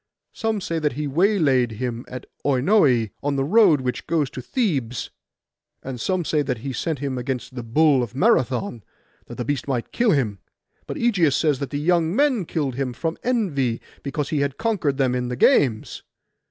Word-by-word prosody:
Some 220 Hz, -2 st, -2 dB
say 165 Hz, -2 st, -2 dB
that 150 Hz, -3 st, 0 dB
he 150 Hz, +4 st, -3 dB
waylaid 145 Hz, -, +2 dB
him 120 Hz, +1 st, -4 dB
by 125 Hz, 0 st, -6 dB, 0.2 s
Oinoe, 130 Hz, -, +3 dB
on 145 Hz, 0 st, -1 dB
the 135 Hz, -, +1 dB
road 175 Hz, -3 st, +5 dB
which 125 Hz, -1 st, -3 dB
goes 150 Hz, -4 st, 0 dB
to 130 Hz, -, -6 dB
Thebes; 135 Hz, -, -2 dB, 0.7 s
and 130 Hz, -3 st, -6 dB
some 185 Hz, -2 st, 0 dB
that 145 Hz, -5 st, 0 dB
he 135 Hz, -1 st, -3 dB
sent 160 Hz, +5 st, -2 dB
him 135 Hz, -1 st, -3 dB
against 130 Hz, 0 st, -4 dB
the 125 Hz, -, -5 dB
bull 135 Hz, +4 st, +3 dB
of 120 Hz, 0 st, -5 dB
Marathon, 125 Hz, -, +1 dB, 0.4 s
that -, -, -8 dB
the 120 Hz, -, -4 dB
beast 145 Hz, -1 st, -2 dB
might 125 Hz, -4 st, -2 dB
kill 240 Hz, -1 st, +2 dB
him. 120 Hz, -, +1 dB, 0.5 s
But -, -, -5 dB
Ægeus 190 Hz, -, +2 dB
says 150 Hz, -2 st, +1 dB
that 140 Hz, -, -4 dB
the 145 Hz, -, -3 dB
young 170 Hz, +2 st, +1 dB
men 265 Hz, -8 st, +2 dB
killed 145 Hz, -5 st, -2 dB
him 130 Hz, -1 st, -3 dB
from 160 Hz, +7 st, -3 dB
envy, 150 Hz, -, 0 dB, 0.2 s
because 140 Hz, 0 st, -3 dB
he 155 Hz, -3 st, 0 dB
had 140 Hz, -1 st, -1 dB
conquered 195 Hz, -12 st, 0 dB
them 130 Hz, -3 st, +2 dB
in 125 Hz, -1 st, -1 dB
the 125 Hz, -, -3 dB
games. 120 Hz, -2 st, +2 dB
140 Hz, 185 wpm, -23 LUFS, 125-165 Hz, 0.7 s, road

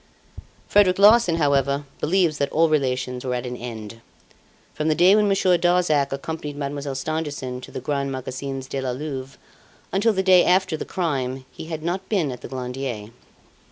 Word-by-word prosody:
"Frederic 195 Hz, -3 st, +4 dB
Larsan, 205 Hz, -3 st, +6 dB
however, 140 Hz, -2 st, +1 dB
believes 170 Hz, -1 st, +1 dB
that 140 Hz, -, 0 dB
all 165 Hz, +1 st, +3 dB
relations 130 Hz, -4 st, -1 dB
were 125 Hz, -1 st, -1 dB
at 125 Hz, 0 st, -3 dB
an 125 Hz, 0 st, -4 dB
end. 115 Hz, -2 st, -8 dB, 0.7 s
From 155 Hz, -, -2 dB
the 155 Hz, -, +3 dB
day 180 Hz, +5 st, +6 dB
when 210 Hz, -1 st, +3 dB
Monsieur 190 Hz, -3 st, +3 dB
Darzac 175 Hz, -6 st, +2 dB
accompanied 150 Hz, +1 st, -5 dB
Mademoiselle 140 Hz, -1 st, -4 dB
Stangerson 145 Hz, -3 st, -4 dB
to -, -, -10 dB
the -, -, -6 dB
Grands 140 Hz, +1 st, -2 dB
Magasins 130 Hz, +1 st, -5 dB
de 135 Hz, -, -3 dB
la 130 Hz, -, -2 dB
Louvre 135 Hz, -1 st, -6 dB, 0.6 s
until 205 Hz, +4 st, +3 dB
the 190 Hz, -2 st, 0 dB
day 185 Hz, -2 st, +6 dB
after 185 Hz, -2 st, +2 dB
the -, -, -5 dB
crime, 135 Hz, -7 st, -2 dB
he 165 Hz, -, -9 dB
had 160 Hz, -1 st, -6 dB
not 180 Hz, +3 st, -3 dB
been 175 Hz, -10 st, +1 dB
at 125 Hz, -, -8 dB
the -, -, -7 dB
Glandier. 125 Hz, -4 st, -5 dB
145 Hz, 175 wpm, -23 LUFS, 130-175 Hz, 0.7 s, Larsan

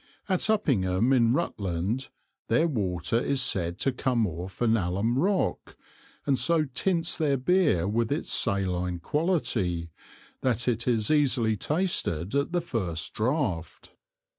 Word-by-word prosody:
At 190 Hz, +2 st, +1 dB
Uppingham 120 Hz, -, +2 dB
in 115 Hz, -2 st, +4 dB
Rutland, 105 Hz, -, -2 dB, 0.4 s
their 165 Hz, -, +3 dB
water 95 Hz, -, -1 dB
is 135 Hz, +2 st, 0 dB
said 90 Hz, -8 st, 0 dB
to 135 Hz, -, +2 dB
come 125 Hz, -2 st, 0 dB
off 90 Hz, +1 st, -6 dB
an 115 Hz, -2 st, +3 dB
Allum 100 Hz, +5 st, 0 dB
rock, 190 Hz, +4 st, -1 dB, 0.5 s
and 135 Hz, -3 st, +2 dB
so 165 Hz, -2 st, +3 dB
tints 165 Hz, +5 st, 0 dB
their 145 Hz, -4 st, +1 dB
Beer 145 Hz, -, +2 dB
with 115 Hz, +3 st, 0 dB
its 150 Hz, +4 st, -1 dB
saline 90 Hz, -4 st, 0 dB
Quality, 90 Hz, -, -1 dB, 0.5 s
that 125 Hz, -2 st, 0 dB
it 120 Hz, 0 st, 0 dB
is 115 Hz, -2 st, +1 dB
easily 130 Hz, -7 st, +3 dB
tasted 105 Hz, -, -1 dB
at 140 Hz, +2 st, 0 dB
the 175 Hz, 0 st, 0 dB
first 95 Hz, -, -3 dB
Draught. 110 Hz, -, -2 dB
120 Hz, 135 wpm, -27 LUFS, 95-150 Hz, 0.5 s, in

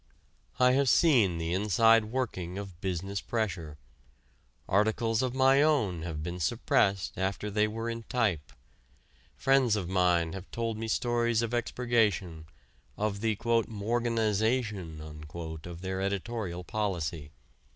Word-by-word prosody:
I 125 Hz, 0 st, +6 dB
have 135 Hz, 0 st, +3 dB
seen 120 Hz, -, +4 dB
the 85 Hz, +1 st, -2 dB
inside 110 Hz, +3 st, +4 dB
working 105 Hz, -7 st, -3 dB
of 95 Hz, -4 st, -8 dB
business 95 Hz, +1 st, -3 dB
pressure; 90 Hz, -10 st, -3 dB, 0.9 s
articles 110 Hz, +3 st, +1 dB
of 130 Hz, -1 st, -2 dB
my 135 Hz, +1 st, +5 dB
own 115 Hz, -, +2 dB
have 80 Hz, -2 st, -5 dB
been 90 Hz, +2 st, -5 dB
suppressed 95 Hz, +5 st, +1 dB
after 95 Hz, +2 st, -2 dB
they 105 Hz, +1 st, +2 dB
were 115 Hz, +2 st, -4 dB
in 115 Hz, 0 st, -3 dB
type; 105 Hz, -, 0 dB, 0.8 s
friends 135 Hz, -4 st, +3 dB
of 95 Hz, -5 st, -3 dB
mine 90 Hz, -3 st, +2 dB
have 95 Hz, -1 st, -8 dB
told 115 Hz, -1 st, -2 dB
me 115 Hz, -, -3 dB
stories 120 Hz, 0 st, +1 dB
of 115 Hz, +1 st, -3 dB
expurgation, 105 Hz, -9 st, 0 dB, 0.5 s
of 105 Hz, -1 st, -2 dB
the 110 Hz, -1 st, +1 dB, 0.3 s
"morganization" 110 Hz, -5 st, -1 dB
of 80 Hz, +2 st, -8 dB
their 95 Hz, 0 st, -3 dB
editorial 100 Hz, -2 st, -3 dB
policy. 85 Hz, -8 st, -3 dB
105 Hz, 125 wpm, -29 LUFS, 90-115 Hz, 0.9 s, I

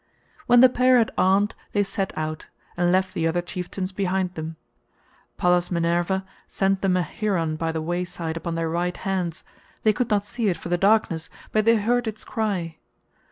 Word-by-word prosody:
When 245 Hz, 0 st, +7 dB
the 260 Hz, -, +10 dB
pair 255 Hz, 0 st, +4 dB
had 230 Hz, -2 st, +2 dB
armed, 195 Hz, +3 st, +3 dB, 0.2 s
they 205 Hz, -, +3 dB
set 195 Hz, 0 st, -3 dB
out, 155 Hz, 0 st, -4 dB, 0.3 s
and 175 Hz, 0 st, +2 dB
left 185 Hz, 0 st, +1 dB
the 165 Hz, -4 st, 0 dB
other 175 Hz, +2 st, 0 dB
chieftains 185 Hz, +1 st, -4 dB
behind 185 Hz, -1 st, -1 dB
them. 160 Hz, -1 st, -6 dB, 0.8 s
Pallas 180 Hz, 0 st, +2 dB
Minerva 175 Hz, +2 st, 0 dB, 0.2 s
sent 195 Hz, 0 st, 0 dB
them 185 Hz, -2 st, +2 dB
a 180 Hz, -, +1 dB
heron 165 Hz, -2 st, -1 dB
by 165 Hz, +1 st, -2 dB
the 160 Hz, -1 st, -3 dB
wayside 175 Hz, -1 st, -3 dB
upon 165 Hz, 0 st, -4 dB
their 165 Hz, 0 st, -1 dB
right 175 Hz, +2 st, -1 dB
hands; 185 Hz, -3 st, -2 dB, 0.4 s
they 215 Hz, -, +4 dB
could 240 Hz, +3 st, -1 dB
not 205 Hz, -1 st, +1 dB
see 230 Hz, +1 st, -2 dB
it 180 Hz, -4 st, +1 dB
for 170 Hz, -, -8 dB
the 175 Hz, -, +2 dB
darkness, 195 Hz, -5 st, +2 dB, 0.2 s
but 215 Hz, 0 st, +2 dB
they 230 Hz, 0 st, +6 dB
heard 235 Hz, +3 st, +1 dB
its 220 Hz, 0 st, -4 dB
cry. 185 Hz, -7 st, -2 dB
185 Hz, 185 wpm, -24 LUFS, 170-205 Hz, 0.8 s, the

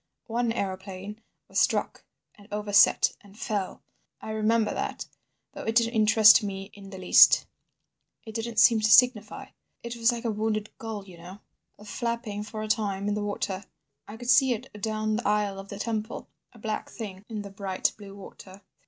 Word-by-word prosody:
One 235 Hz, 0 st, -1 dB
aeroplane 195 Hz, 0 st, -5 dB, 0.3 s
was -, -, -1 dB
struck, -, -, 0 dB, 0.3 s
and 205 Hz, -1 st, -18 dB
overset 205 Hz, -1 st, +3 dB
and 200 Hz, 0 st, -18 dB
fell. 205 Hz, -4 st, -4 dB, 0.4 s
I 220 Hz, -, -7 dB
remember 220 Hz, +1 st, +1 dB
that—though -, -, -8 dB
it 225 Hz, -, -2 dB
didn't 230 Hz, 0 st, +3 dB
interest 220 Hz, 0 st, +6 dB
me 195 Hz, -1 st, -6 dB
in 200 Hz, -1 st, -12 dB
the 190 Hz, -, -9 dB
least. 185 Hz, -1 st, +6 dB, 0.8 s
It 220 Hz, -, -9 dB
didn't 225 Hz, 0 st, -5 dB
seem 230 Hz, 0 st, +6 dB
to 215 Hz, -, +2 dB
signify. 225 Hz, -2 st, +4 dB, 0.3 s
It 235 Hz, 0 st, -5 dB
was 230 Hz, +1 st, +3 dB
like 235 Hz, 0 st, -6 dB
a 230 Hz, -, +1 dB
wounded 215 Hz, 0 st, -2 dB
gull, 220 Hz, -3 st, -6 dB
you 180 Hz, -3 st, -14 dB
know—flapping 210 Hz, +4 st, -7 dB
for 215 Hz, 0 st, -6 dB
a -, -, -4 dB
time 205 Hz, -3 st, -1 dB
in -, -, 0 dB
the 210 Hz, -, -2 dB
water. 200 Hz, -1 st, -3 dB, 0.4 s
I 210 Hz, -, -9 dB
could 245 Hz, +1 st, 0 dB
see 265 Hz, +1 st, +5 dB
it 220 Hz, -, -8 dB
down 215 Hz, 0 st, -1 dB
the 240 Hz, -, -3 dB
aisle 205 Hz, -2 st, 0 dB
of 195 Hz, 0 st, -10 dB
the 200 Hz, -, -7 dB
temple—a 220 Hz, +2 st, -6 dB
black 215 Hz, -1 st, -4 dB
thing 200 Hz, -4 st, -8 dB
in 215 Hz, -2 st, -5 dB
the 200 Hz, -, -9 dB
bright 195 Hz, -1 st, -1 dB
blue 200 Hz, -2 st, -12 dB
water. 195 Hz, 0 st, -13 dB
215 Hz, 170 wpm, -27 LUFS, 200-225 Hz, 0.8 s, interest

